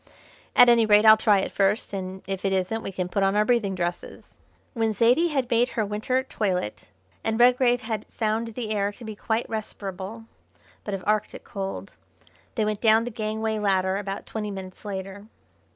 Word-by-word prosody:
"At 245 - +8
any 235 -2 +5
rate, 210 0 +5
I'll 220 0 +10
try 210 -3 +3
it - - -4
first, 200 +2 0
and 190 -1 -5
if 195 -1 -4
it 195 - +1
isn't 190 +4 -1
we 195 - -5
can 180 -1 -3
put 195 +3 -1
on 195 +1 +2
our 210 0 +3
breathing 215 -5 +1
dresses." 175 -1 -5 0.3
When 225 -4 0
Zaidie 245 - +4
had 270 -5 -1
made 240 +2 +3
her 220 - +2
winter 220 +6 -1
toilet, 185 - -3 0.3
and 225 0 -1
Redgrave 245 0 +4
had 220 -2 -4
found 225 0 -2
the 230 -4 -4
air 205 -1 0
to 235 - -11
be 215 -1 -6
quite 220 +3 -2
respirable, 210 0 -6 0.6
but 205 - -3
of 190 - -7
Arctic 215 0 -1
cold, 195 0 -6 0.6
they 220 -4 +1
went 210 -1 -2
down 220 0 +5
the 245 - -5
gangway 220 0 -2
ladder 190 -2 +1
about 200 0 -5
twenty 215 -1 -4
minutes 190 -2 -8
later. 195 +1 -6
215 Hz, 185 wpm, -25 LUFS, 195-225 Hz, 0.6 s, I'll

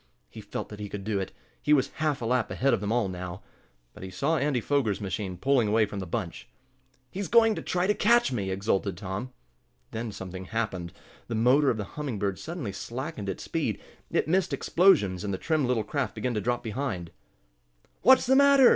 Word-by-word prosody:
He 110 - -9
felt 100 - -5
that 105 - -9
he 105 -1 -5
could 100 -1 -6
do 105 -1 -1
it. 95 - -4 0.3
He 150 - +3
was 135 -3 +3
half 150 -5 0
a - - -1
lap 125 -1 +1
ahead 135 +2 +1
of - - +1
them 105 +1 -2
all 120 -3 +2
now. 90 -1 -6 0.5
But - - -13
he 95 - -6
saw 140 - 0
Andy 140 -2 +1
Foger's 120 -5 0
machine 95 -1 -3
pulling 130 +1 +2
away 110 +1 +4
from 100 -1 -6
the 95 - -5
bunch. 90 -2 -4 0.6
"He's 195 0 -3
going 225 -1 +5
to - - -4
try 180 0 0
to 210 - +3
catch 235 - +4
me!" 100 -6 -2
exulted 95 -1 0
Tom. 100 +6 -5 0.6
Then 115 0 -4
something 95 -1 -7
happened. 95 -6 -3 0.4
The 115 - -3
motor 130 +6 +4
of 115 - +1
the 105 - -2
Humming 135 +2 -5
Bird 100 -1 -1
suddenly 160 - -5
slackened 115 0 -5
its 95 - -4
speed, - - -2 0.3
it - - +1
missed 185 +3 +1
explosions, 140 - +3
and 100 - -2
the 95 - -1
trim 155 - +1
little 120 -3 +1
craft 140 +5 -2
began 125 -1 -1
to 105 - -1
drop 120 +3 -1
behind. 110 -7 -3 0.9
"What's 260 +2 +6
the 265 +1 +4
matter?" 280 -2 +7
115 Hz, 210 wpm, -28 LUFS, 100-145 Hz, 0.9 s, matter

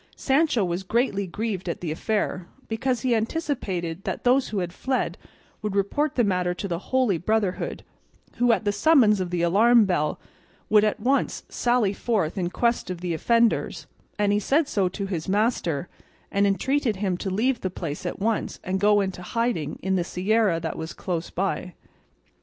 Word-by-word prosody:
Sancho 270 - +2
was 175 +1 -2
greatly 200 -1 0
grieved 195 -1 -3
at 170 - -3
the 170 -3 -3
affair, 185 0 -2 0.2
because 245 +1 -1
he 250 0 +1
anticipated 215 - -2
that - - -4
those 255 +2 +3
who 210 - -3
had 175 -2 -2
fled 260 +5 -1 0.5
would 210 -2 -3
report 265 +10 0
the 245 - +3
matter 180 -3 0
to 200 - -4
the 170 -2 -2
Holy 255 -9 +2
Brotherhood, 205 0 -1 0.5
who 245 0 +4
at 225 - +1
the 205 - +3
summons 230 -5 +4
of 185 -1 -2
the 175 -1 -1
alarm 220 +6 +5
bell 155 -6 0 0.5
would 210 -1 +6
at 215 0 +1
once 265 +5 0
sally 240 -5 +1
forth 200 -7 -1
in 180 -3 -1
quest 235 +1 0
of 180 -2 -5
the 175 -2 -2
offenders; 230 +7 +1 0.3
and 205 -1 +2
he 205 - +2
said 280 +8 +2
so 195 -8 +1
to 200 +2 -4
his 180 -3 -4
master, 195 - 0 0.4
and 200 0 +3
entreated 240 +5 +1
him 190 -1 -1
to 190 - -3
leave 235 +6 0
the 185 - -1
place 165 -5 -5
at 175 - -3
once, 220 +2 -1
and 190 +1 -1
go 205 0 +4
into 190 -2 -3
hiding 180 -6 -2
in 190 0 +1
the 175 - +1
sierra 190 0 +1
that 165 0 -4
was 160 +1 -5
close 170 -3 -3
by. 185 -1 -2
200 Hz, 180 wpm, -25 LUFS, 180-235 Hz, 0.5 s, would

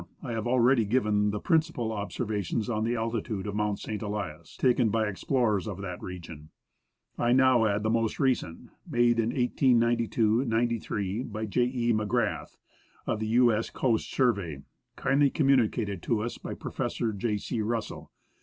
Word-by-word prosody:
I 125 - -4
have 115 0 -2
already 125 0 +4
given 105 -2 +1
the 105 0 -2
principal 160 - +1
observations 105 +1 -2
on 110 -1 0
the 120 +1 0
altitude 110 -3 -3
of 105 - -4
Mount 105 -1 0
St. 110 0 -5
Elias, 100 -7 -5
taken 125 -3 +3
by 110 +1 +1
explorers 105 -1 0
of 100 -4 -5
that 90 -2 -6
region. 80 -4 -9 0.7
I 120 +1 +3
now 130 -3 +5
add 105 0 0
the 110 - +1
most 115 -1 0
recent, 130 - -1 0.2
made 120 -1 +3
in 115 0 +1
1892 120 -2 +2
93, 115 -3 -1
by 110 -3 -4
J. 120 +4 +1
E. 120 -2 0
MacGrath, 105 -7 -1 0.5
of - - -1
the 110 - -2
"U.S. 115 -1 +3
Coast 115 -4 0
Survey," 100 - 0 0.3
kindly 140 +1 +2
communi 135 -6 +3
cated 100 -4 -4
to 110 +2 0
us 120 - -5
by - - -6
Prof. - - -4 0.2
J. 105 +1 -1
C. 110 +2 -3
Russell. 115 +1 -4
115 Hz, 160 wpm, -28 LUFS, 105-120 Hz, 0.7 s, now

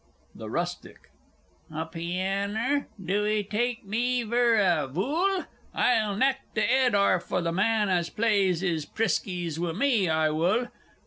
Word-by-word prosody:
THE - - -8
RUSTIC. - - -5 0.6
A 160 +1 -3
pianner? 195 - -2
Do 195 +3 -1
'ee 215 0 +1
take 225 +3 -2
me 240 +4 0
vur 235 +1 +2
a 175 -8 +2
vool? 315 - 0 0.3
I'll 215 -5 +2
knack 265 +4 +2 0.2
th' 215 - +2
'ed 255 -1 +3
arf 200 -3 +2
o' - - +1
the 170 -1 -1
man 210 +4 +1
as 175 -3 0
plays 200 -5 +1
'is 165 -5 0
priskies 175 -3 -2
wi' 170 -1 -2
me, 220 -3 +2
I 160 -1 +2
wull! 185 +11 +1
200 Hz, 145 wpm, -27 LUFS, 175-235 Hz, 0.6 s, ed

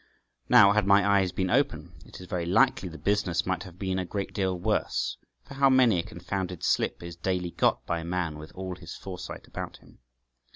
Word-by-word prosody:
Now, 100 0 +8
had 105 -1 +2
my 100 +1 +5
eyes 100 -2 +3
been 95 0 -1
open, 85 - 0
it - - -12
is 90 - -9
very 90 -2 -3
likely 95 -1 +3
the 80 - -9
business 100 -3 0
might 95 -2 -1
have 90 -2 -10
been 95 -1 -2
a - - -1
great 100 +2 -4
deal 95 -2 0
worse, 105 +4 -1 0.3
for - - -12
how 135 0 +4
many 125 -8 +5
a - - -1
confounded 90 0 -5
slip - - 0
is 85 -1 -7
daily 90 0 -2
got - - +1
by 85 +4 -2
man 85 -2 -3
with 75 - -10
all 95 -1 -5
his 85 -2 -9
foresight 90 -2 -8
about - - -7
him. - - -21
95 Hz, 205 wpm, -27 LUFS, 85-100 Hz, 0.3 s, Now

